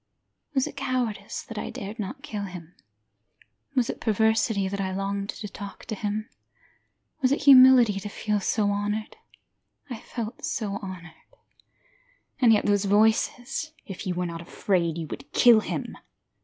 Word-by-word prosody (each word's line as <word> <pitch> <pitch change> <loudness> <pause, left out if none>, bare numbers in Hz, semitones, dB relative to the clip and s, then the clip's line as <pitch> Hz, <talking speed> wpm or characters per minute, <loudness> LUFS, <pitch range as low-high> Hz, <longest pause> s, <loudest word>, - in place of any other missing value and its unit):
Was 265 - +3
it - - -7
cowardice, 245 -7 -2
that 225 -2 -7
I - - -4
dared 205 +4 -7
not 210 +7 -5
kill 210 -8 -4
him? 180 -3 -10 1.0
Was 250 -3 +2
it - - -5
perversity, 220 -2 +2
that 200 +1 -3
I 190 -1 -2
longed 200 +1 -3
to 210 - -5
talk 200 0 -9
to 225 - -5
him? 215 +1 -3 0.9
Was 255 -1 +3
it 285 - 0
humility, 255 -6 +8
to 205 +1 -6
feel 210 0 -1 0.2
honoured? 205 +1 -1 0.8
I 235 - -5
felt 230 0 -6
so 200 -3 -2
honoured. 185 -4 -8 1.3
And 240 -3 +6
yet 215 - +3
those 205 -1 +2
voices: 220 +8 +1
If 195 -1 -7
you 180 - -1
were 180 0 -1
not 170 -1 -5
afraid 170 -1 -1
you 165 - -3
would 140 +1 -8
kill 235 -3 +7
him. - - -4
210 Hz, 155 wpm, -26 LUFS, 195-230 Hz, 1.3 s, humility